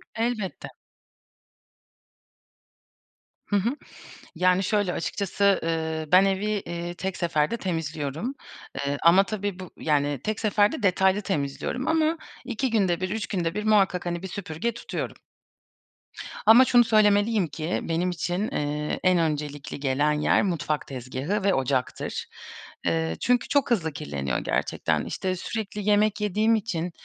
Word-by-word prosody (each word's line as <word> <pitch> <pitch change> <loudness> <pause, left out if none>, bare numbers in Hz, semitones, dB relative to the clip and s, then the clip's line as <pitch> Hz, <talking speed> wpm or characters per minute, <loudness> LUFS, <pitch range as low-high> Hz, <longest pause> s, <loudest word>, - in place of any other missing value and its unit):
Elbette. 225 -4 -2 2.8
Hı 205 - 0
hı, 200 +3 +2 0.7
yani, 185 +1 +3
şöyle 205 -2 +1
açıkçası, 200 +2 +1
ııı, 160 -1 -2
ben 185 +2 +8
evi, 195 +1 0
eee, 175 -4 -3
tek 190 +1 -4
seferde 165 +3 0
temizliyorum. 160 - -3 0.4
Eee, 140 0 -1
ama 180 +4 +6
tabii 205 -3 -4
bu, 185 -2 -8
yani, 145 -3 0
tek 215 0 -2
seferde 210 -1 +2
detaylı 190 0 +3
temizliyorum 190 - -2
ama 320 0 +2 0.3
2 250 +1 -2
günde 190 -6 +1
1, 185 0 -2
3 220 0 -2
günde 175 -4 -2
1 210 +1 -3
muhakkak, 195 -4 +3
hani, 175 0 -2
bir 190 - -5
süpürge 190 +3 -3
tutuyorum. 235 - -5 1.3
Ama 235 +4 +8
şunu 245 -1 +6
söylemeliyim 210 -2 +3
ki, 155 +2 -3
benim 170 +2 0
için, 180 +4 -2
eee, 150 +1 -2
en 185 -1 +4
öncelikli 150 -3 -2
gelen 140 +2 +1
yer 150 0 +2
mutfak 165 -5 -1
tezgâhı 135 - -3
ve 195 -1 +3
ocaktır. 130 -1 -1 0.6
Eee, 80 -1 0
çünkü 245 0 +2
çok 285 -3 +1
hızlı 165 -9 +1
kirleniyor 70 - -3
gerçekten. - - -1
İşte 185 -1 -2
sürekli 210 +1 -4
yemek 210 0 +3
yediğim 215 +3 +2
için, 180 -6 -2
185 Hz, 135 wpm, -26 LUFS, 155-210 Hz, 2.8 s, ben